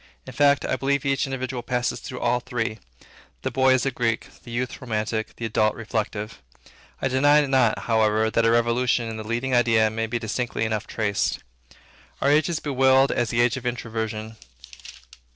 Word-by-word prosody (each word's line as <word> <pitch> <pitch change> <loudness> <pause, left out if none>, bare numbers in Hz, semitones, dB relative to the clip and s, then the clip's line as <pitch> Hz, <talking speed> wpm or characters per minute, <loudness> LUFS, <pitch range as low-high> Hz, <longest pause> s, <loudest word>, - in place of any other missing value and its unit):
In 130 - -9
fact, 140 +2 +3
I 130 - -1
believe 140 +1 0
each 135 0 +1
individual 130 -1 -4
passes 125 0 -2
through 125 - -8
all 120 +1 +2
three. 120 -3 -3 0.6
The - - -2
boy 130 0 +3
is 130 - 0
a 135 - +1
Greek; 115 -2 -1
the - - -12
youth, 120 +1 -3
romantic; 110 -2 -3
the 115 - -5
adult, 110 -1 +1
reflective. 110 -1 -4 0.6
I - - +3
deny 145 +3 +4
not, 130 -5 +2
however, 110 -1 +2
that 115 - +2
a 115 - +4
revolution 120 +1 +2
in 110 0 -5
the 110 - -5
leading 120 +4 -2
idea 115 -3 +3
may 115 +1 -2
be 120 +2 -2
distinctly 115 0 -2
enough 110 -2 -2
traced. 105 -3 -1 0.8
Our 140 - +2
age 150 +2 +3
is 170 - -1
bewailed 135 -1 +3
as 120 - 0
the 120 0 +1
age 120 +1 +2
of 130 - -8
Introversion. 110 -2 -4
120 Hz, 180 wpm, -24 LUFS, 110-130 Hz, 0.8 s, deny